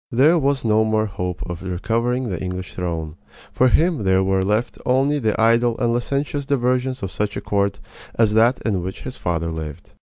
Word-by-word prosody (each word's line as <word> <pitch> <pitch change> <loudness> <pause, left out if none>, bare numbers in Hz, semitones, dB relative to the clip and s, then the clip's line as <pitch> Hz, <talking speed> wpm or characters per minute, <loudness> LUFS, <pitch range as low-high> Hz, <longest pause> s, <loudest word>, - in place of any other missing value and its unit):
There 150 +8 +4
was 140 -3 0
no 110 0 +4
more 110 0 +1
hope 90 -4 -4
of 85 -1 -6
recovering 115 +7 -1
the 90 -4 -4
English 90 0 -5
throne. 85 -3 -4 0.4
For 130 - +4
him 160 - +2
there 95 0 +3
were 95 0 +1
left 105 +5 -1
only 135 +3 +2
the 110 -4 0
idle 115 +1 +3
and 120 -2 +1
licentious 140 +4 -1
diversions 130 -2 0
of 95 - -3
such 105 0 -2
a - - -4
court 100 0 0 0.4
as 110 -2 +3
that 115 +4 +4
in 100 -5 0
which 95 +2 -6
his 130 - -6
father 85 -1 -2
lived. 80 0 -7
110 Hz, 190 wpm, -21 LUFS, 95-125 Hz, 0.4 s, There